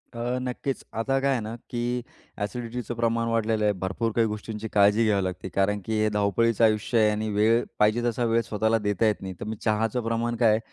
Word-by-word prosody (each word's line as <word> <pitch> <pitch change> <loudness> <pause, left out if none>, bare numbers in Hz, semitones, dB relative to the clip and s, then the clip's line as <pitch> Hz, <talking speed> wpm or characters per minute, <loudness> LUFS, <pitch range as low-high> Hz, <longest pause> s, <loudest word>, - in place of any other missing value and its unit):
अ, 120 +2 -2
नक्कीच. 130 +1 -3
आता 135 +5 0
काय 140 +1 +1
आहे 130 - +1
ना, 110 +2 -5
की 120 +1 -2 0.4
एसिडिटीचं 120 +1 -5
प्रमाण 115 0 0
वाढलेलं 110 -1 +1
आहे, 105 - +3
भरपूर 115 +5 -1
काही 115 -1 +3
गोष्टींची 105 +1 -5
काळजी 105 +2 +5
घ्यावी 100 -3 +2
लागते, 95 0 -4
कारण 105 +1 +2
की 110 - -2
हे 110 - +3
धावपळीचं 105 +2 +1
आयुष्य 110 +2 +2
आहे; 110 -1 +5
आणि 110 +1 -2
वेळ 110 +3 +3 0.2
पाहिजे 110 +3 +3
तसा 120 0 0
वेळ 115 0 +2
स्वतःला 110 0 0
देता 105 +2 +1
येत 105 - 0
नाही. 95 -1 -5
तर - - -5
मी 110 - -3
चहाचं 110 +2 0
प्रमाण 115 +1 -1
काय 115 -1 +4
आहे, 110 - +2
115 Hz, 215 wpm, -26 LUFS, 105-120 Hz, 0.4 s, काळजी